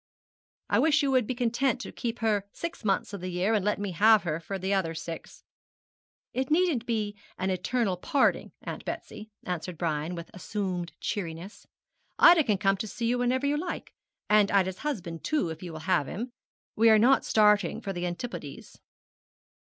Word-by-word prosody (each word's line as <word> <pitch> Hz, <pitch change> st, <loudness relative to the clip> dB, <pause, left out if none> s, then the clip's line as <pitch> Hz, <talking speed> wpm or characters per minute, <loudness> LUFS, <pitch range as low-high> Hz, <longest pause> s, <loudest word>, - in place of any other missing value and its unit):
'I -, -, +4 dB
wish 310 Hz, -1 st, +4 dB
you 275 Hz, -, +2 dB
would 255 Hz, -4 st, +3 dB
be 255 Hz, -, -2 dB
content 245 Hz, +2 st, +1 dB
to -, -, -7 dB
keep 235 Hz, 0 st, -4 dB
her 210 Hz, -3 st, +1 dB
six 335 Hz, -7 st, -6 dB
months 200 Hz, 0 st, 0 dB
of 200 Hz, -, -5 dB
the 185 Hz, -, -4 dB
year, 180 Hz, +5 st, 0 dB
and 210 Hz, -3 st, +2 dB
let 210 Hz, +1 st, +1 dB
me 200 Hz, -1 st, -3 dB
have 210 Hz, +3 st, +5 dB
her 160 Hz, -3 st, -2 dB
for 195 Hz, +4 st, -5 dB
the 190 Hz, +1 st, -1 dB
other 165 Hz, -4 st, 0 dB
six.' 165 Hz, 0 st, -8 dB, 0.9 s
'It 260 Hz, 0 st, -1 dB
needn't 310 Hz, -7 st, +2 dB
be 215 Hz, -3 st, -1 dB, 0.2 s
an 190 Hz, +1 st, -1 dB
eternal 190 Hz, +1 st, 0 dB
parting, 280 Hz, -, +1 dB
Aunt -, -, -6 dB
Betsy,' 215 Hz, +1 st, -7 dB
answered 180 Hz, -1 st, -4 dB
Brian, 160 Hz, +1 st, -2 dB
with 170 Hz, -1 st, -8 dB
assumed 185 Hz, -2 st, -3 dB
cheeriness; 175 Hz, 0 st, -5 dB, 0.5 s
'Ida 340 Hz, -2 st, +8 dB
can 210 Hz, -3 st, +2 dB
come 195 Hz, 0 st, +2 dB
to 220 Hz, -, -4 dB
see 230 Hz, +3 st, -4 dB
you 245 Hz, +1 st, +1 dB
whenever 255 Hz, +2 st, +1 dB
you 290 Hz, +1 st, +1 dB
like, 355 Hz, +2 st, -5 dB, 0.3 s
and 210 Hz, -1 st, +5 dB
Ida's 190 Hz, -2 st, +1 dB
husband 180 Hz, -, -4 dB
too, 300 Hz, -, 0 dB
if 160 Hz, -, -8 dB
you 180 Hz, -2 st, -6 dB
will 155 Hz, -1 st, -7 dB
have 175 Hz, -6 st, +1 dB
him. 240 Hz, +6 st, -5 dB, 0.4 s
We 225 Hz, +1 st, +5 dB
are 220 Hz, -, +7 dB
not 255 Hz, +5 st, +5 dB
starting 210 Hz, -4 st, +3 dB
for 195 Hz, -, -4 dB
the 175 Hz, 0 st, -2 dB
Antipodes.' 175 Hz, -, -7 dB
205 Hz, 185 wpm, -28 LUFS, 180-240 Hz, 0.9 s, Ida